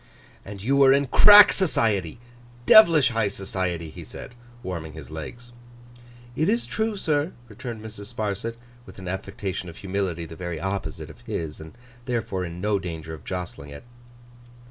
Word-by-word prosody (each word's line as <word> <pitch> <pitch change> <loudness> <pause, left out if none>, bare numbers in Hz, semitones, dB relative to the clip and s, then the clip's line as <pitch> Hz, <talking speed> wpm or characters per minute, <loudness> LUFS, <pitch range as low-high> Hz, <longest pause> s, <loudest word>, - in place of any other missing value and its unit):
'And 100 -1 -9
you 135 +5 +2
were 135 -1 +6
in 140 +1 +3
crack 205 +9 +8
society. 110 - +1 0.5
Devilish 165 -10 +7
high 115 -3 0
society,' 95 -4 -3
he - - -10
said, - - -10 0.3
warming 85 -6 -5
his 80 -1 -10
legs. 120 +10 -8 0.8
'It 155 +7 +1
is 230 +3 +1
true, 220 -1 -2
sir,' 155 -2 0
returned 115 0 -8
Mrs. 110 -2 -9
Sparsit, 110 0 -3 0.3
with - - -13
an 95 -1 -9
affectation 95 0 -5
of 85 - -12
humility 95 -3 -3
the 80 0 -10
very 85 -1 -5
opposite 95 -4 -4
of - - -18
his, 80 -2 -4
and 80 +8 -12 0.3
therefore 115 -7 -2
in 85 0 -6
no 105 +1 0
danger 80 -3 -6
of 80 - -10
jostling 90 -6 -6
it. 70 0 -10
100 Hz, 160 wpm, -24 LUFS, 85-120 Hz, 0.8 s, crack